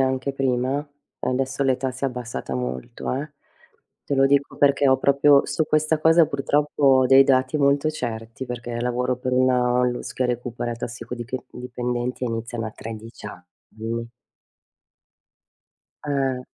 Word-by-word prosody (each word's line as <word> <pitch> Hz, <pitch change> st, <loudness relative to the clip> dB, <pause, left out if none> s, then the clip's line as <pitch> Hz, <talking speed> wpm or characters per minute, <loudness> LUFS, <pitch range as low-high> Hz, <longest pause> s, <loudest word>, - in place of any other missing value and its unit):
anche 130 Hz, +1 st, 0 dB
prima? 135 Hz, +2 st, 0 dB, 0.3 s
Adesso 130 Hz, +1 st, -1 dB
l'età 130 Hz, 0 st, +1 dB
si 130 Hz, +2 st, -6 dB
è -, -, +4 dB
abbassata 125 Hz, -, -5 dB
molto, 65 Hz, -, -4 dB
eh, 145 Hz, +3 st, -4 dB, 0.7 s
te 140 Hz, -, 0 dB
lo 135 Hz, -, +4 dB
dico 140 Hz, +1 st, +2 dB
perché 140 Hz, 0 st, +4 dB
ho 130 Hz, -, +5 dB
proprio 140 Hz, +1 st, +4 dB
su 160 Hz, -, -1 dB
questa 155 Hz, +1 st, +2 dB
cosa 160 Hz, +1 st, +6 dB
purtroppo 145 Hz, +1 st, -1 dB
ho 130 Hz, -2 st, +6 dB
dei 135 Hz, +1 st, +8 dB
dati 130 Hz, +1 st, +2 dB
molto 140 Hz, +2 st, +3 dB
certi, 115 Hz, -3 st, -5 dB
perché 120 Hz, -1 st, -5 dB
lavoro 125 Hz, +1 st, 0 dB
per 130 Hz, 0 st, -3 dB
una 125 Hz, -1 st, +3 dB
ONLUS 125 Hz, 0 st, 0 dB
che 130 Hz, -, 0 dB
recupera 120 Hz, -1 st, -2 dB
tossicodiche 120 Hz, +1 st, -6 dB
dipendenti 125 Hz, 0 st, -3 dB
e -, -, -1 dB
iniziano 115 Hz, 0 st, -4 dB
a 110 Hz, -, -5 dB
13 110 Hz, 0 st, -9 dB
anni. 110 Hz, +5 st, -7 dB, 2.0 s
Eh. 135 Hz, -3 st, 0 dB
130 Hz, 140 wpm, -23 LUFS, 120-135 Hz, 2.0 s, dei